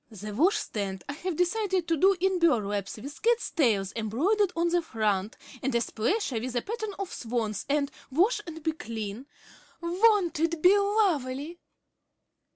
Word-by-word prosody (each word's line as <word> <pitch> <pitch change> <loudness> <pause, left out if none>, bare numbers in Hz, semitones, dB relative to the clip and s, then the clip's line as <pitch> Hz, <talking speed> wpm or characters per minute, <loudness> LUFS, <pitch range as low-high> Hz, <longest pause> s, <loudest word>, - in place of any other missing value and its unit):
The 210 -1 -7
washstand 205 - 0
I 285 - -4
have 345 +3 -4
decided 370 0 0
to 330 - +2
do 385 +6 +4
in 380 0 +1
burlaps 205 - +1
with 280 +7 -9
cat 470 +1 +4 0.2
tails 210 - +2
embroidered 330 - +1
on 340 +1 +1
the 350 0 +2
front, 215 - -1 0.2
and 265 -1 -1
a - - +4
splasher 240 - -1
with 250 +2 -5
a 240 - 0
pattern 435 -1 -4
of 395 -2 -5
swans 225 -3 -3
and, 285 0 +1 0.2
'Wash 380 - +2
and 320 -1 -8
be 320 - +1
clean.' 225 -3 -6 0.5
Won't 360 0 +2
it 330 0 0
be 360 +5 +6
lovely? 345 - 0
310 Hz, 160 wpm, -28 LUFS, 225-375 Hz, 0.5 s, be